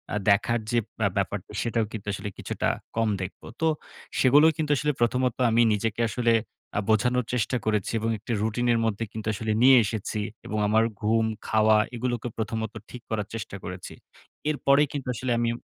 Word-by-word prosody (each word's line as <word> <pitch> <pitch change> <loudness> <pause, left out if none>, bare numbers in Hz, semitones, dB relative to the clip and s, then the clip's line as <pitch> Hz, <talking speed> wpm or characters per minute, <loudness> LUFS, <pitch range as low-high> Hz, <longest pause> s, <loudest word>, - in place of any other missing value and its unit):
আ - - +1
দেখার 115 +3 +3
যে 120 - +3 0.2
ব্য - - 0
ব্যাপারটা, 100 0 -2
সেটাও 115 -2 0
কিন্তু 105 -2 -7
আসলে 105 - -4
কিছুটা - - -2 0.3
কম 115 -1 +2
দেখব। 95 - -6 0.2
তো 160 - +3 0.5
সেগুলোও 145 +5 +6
কিন্তু 150 -2 -1
আসলে 150 +2 +1
প্রথমত 125 +1 +2 0.2
আমি 115 +1 +4
নিজেকে 110 +2 -2
আসলে 120 -1 +1 0.5
আ - - +3
বোঝানোর 125 +3 +2
চেষ্টা 125 +1 0
করেছি 105 -3 0
এবং 115 +1 -1
একটি 110 +4 -7
রুটিনের 115 +2 +1
মধ্যে 110 0 -1
কিন্তু 110 -1 -6
আসলে 110 +1 -2
নিয়ে 130 0 +8
এসেছি 105 0 -3 0.3
এবং 105 - -3
আমার 110 +2 +4 0.2
ঘুম, 110 +1 +2 0.2
খাওয়া 110 0 +4 0.2
এগুলোকে 120 0 -2
প্রথমত 110 0 -3 0.2
ঠিক 125 - -9
করার 105 -2 -2
চেষ্টা 110 -3 -5
করেছি। 90 0 -7 0.6
এরপরেই 145 0 +3
কিন্তু 140 -3 -4
আসলে 125 +1 -2
আমি… 120 0 +1
115 Hz, 175 wpm, -26 LUFS, 110-125 Hz, 0.6 s, নিয়ে